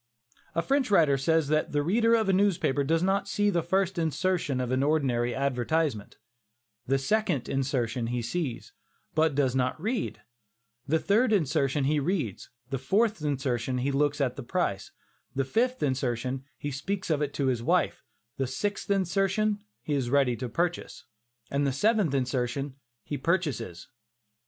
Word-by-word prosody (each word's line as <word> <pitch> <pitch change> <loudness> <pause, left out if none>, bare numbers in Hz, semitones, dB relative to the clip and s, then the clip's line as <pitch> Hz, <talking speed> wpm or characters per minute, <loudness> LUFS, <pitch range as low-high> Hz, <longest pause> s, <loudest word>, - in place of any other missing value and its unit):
'" - - -32
A 165 - +1
French 270 -2 +1
writer 160 -8 +5
says 160 +3 +2
that 155 0 +1
"The 145 0 +2
reader 230 +7 +3
of 220 -2 +1
a 195 - +3
newspaper 185 -8 +2
does 165 +4 +1
not 195 +1 +1
see 205 +1 +1
the 175 -3 +1
first 190 +2 0
insertion 165 -2 0
of 125 -1 -2
an 130 +1 +2
ordinary 135 -5 +1
advertisement; 135 -2 -1 0.7
the 135 +2 +3
second 145 - 0
insertion 130 -3 -1
he 120 0 -2
sees, 130 0 -3 0.4
but 155 -2 +2
does 135 -3 +2
not 130 +2 0
read; 225 +8 -2 0.6
the 160 +3 +3
third 215 +8 +2
insertion 150 -7 +1
he 150 +2 +2
reads; 145 - -2 0.2
the 135 - -1
fourth 205 - +1
insertion, 130 -4 -1
he 130 +3 0
looks 145 +1 +1
at 130 -3 0
the - - -4
price; 120 - -2 0.5
the 135 0 +1
fifth 250 - 0
insertion, 130 -1 -1
he 145 - -4
speaks 185 +7 -3
of 150 -1 +1
it 145 -1 -1
to 140 - 0
his 125 -3 +1
wife; - - +1 0.3
the 135 - 0
sixth 200 +12 -3
insertion, 195 +2 +1 0.2
he 150 - -2
is 135 -4 0
ready 135 -2 +3
to 125 0 -5
purchase, 170 -7 -2 0.5
and 140 0 +1
the - - +1
seventh 205 - +2
insertion, 130 +1 -1 0.3
he 145 - -4
purchases." 150 - -1
145 Hz, 165 wpm, -28 LUFS, 130-185 Hz, 0.7 s, writer